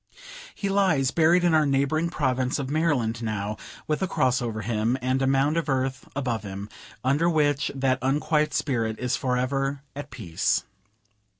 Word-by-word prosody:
He 200 - -3
lies 185 -10 +2
buried 170 +2 +4
in 175 -2 +3
our 155 -2 +4
neighboring 140 +4 +1
province 130 -5 0
of 140 -1 -4
Maryland 135 -8 +1
now, 105 -1 -3 0.3
with 155 +2 -1
a 190 - +1
cross 130 -6 +1
over 115 -2 -3
him, 115 +3 0
and 130 +1 0
a 135 - +2
mound 135 +4 +2
of 165 -2 -1
earth 130 0 -1
above 125 -5 -1
him; 100 0 -7 0.3
under 145 +6 +2
which 145 -3 +2
that 130 -1 +1
unquiet 150 +3 +1
spirit 115 -6 0
is 125 0 -1
for 125 -2 0
ever 135 +2 -1
at 145 +1 -6
peace. 85 -9 -1
135 Hz, 170 wpm, -25 LUFS, 125-150 Hz, 0.3 s, buried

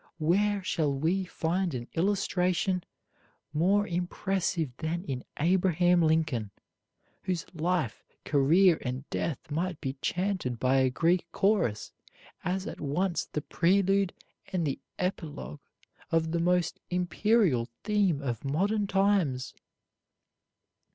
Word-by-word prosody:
Where 195 +5 +2
shall 155 -5 0
we 165 +8 0
find 175 -1 -1
an 120 -1 -5
illustration 185 -1 +1 0.7
more 195 +7 +3
impressive 175 -5 -1
than 165 +4 -2
in 130 -9 -4
Abraham 175 +1 +3
Lincoln, 155 -9 +1 0.7
whose 180 -3 -2
life, 165 -7 -1 0.2
career, 160 +5 +4
and 130 +2 -4
death 150 -1 -3
might 170 +2 -2
be 135 -1 -4
chanted 180 -9 -1
by 130 +2 +3
a 130 -1 +4
Greek 170 +6 +1
chorus 195 - +1 0.5
as 185 +2 -1
at - - -7
once 170 +5 0
the 150 - -4
prelude 195 +3 +2 0.4
and 180 -3 0
the 140 - -2 0.2
epilogue 150 - -4 0.5
of 160 -1 +1
the 170 - 0
most 180 0 +1
imperial 180 - +2
theme 195 -9 +1
of 120 -5 -3
modern 200 +9 0
times? 195 -10 +1
170 Hz, 115 wpm, -29 LUFS, 145-190 Hz, 0.7 s, career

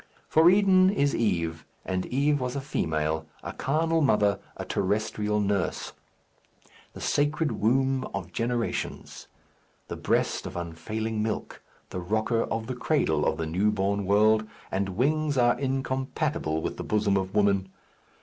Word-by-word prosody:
For 160 +2 +6
Eden 190 -1 +5
is 145 -8 +1
Eve, 85 -7 0 0.2
and 95 0 -2
Eve 145 +3 +1
was 125 +1 -2
a - - -1
female, 80 - -1 0.2
a - - -5
carnal 165 +3 +1
mother, 105 -7 +3 0.2
a - - -5
terrestrial 105 +1 0
nurse; 100 -2 -1 1.0
the - - -10
sacred 150 +1 +1
womb 130 +5 +1
of 95 -2 -6
generations; 120 0 -3 0.6
the - - -4
breast - - 0
of - - -8
unfailing 105 +6 -3
milk; 110 0 -3 0.3
the 90 - -3
rocker 110 +5 0
of 115 0 -3
the 130 - -4
cradle 100 - +1
of - - 0
the 80 - -2
newborn 100 +3 0
world, 110 +2 +4 0.2
and 95 -1 -2
wings 150 +3 +1
are 120 0 +3
incompatible 130 - -1
with - - -3
the - - -4
bosom 105 -2 +1
of 95 -1 -2
woman. 100 -2 +2
110 Hz, 140 wpm, -27 LUFS, 95-135 Hz, 1.0 s, For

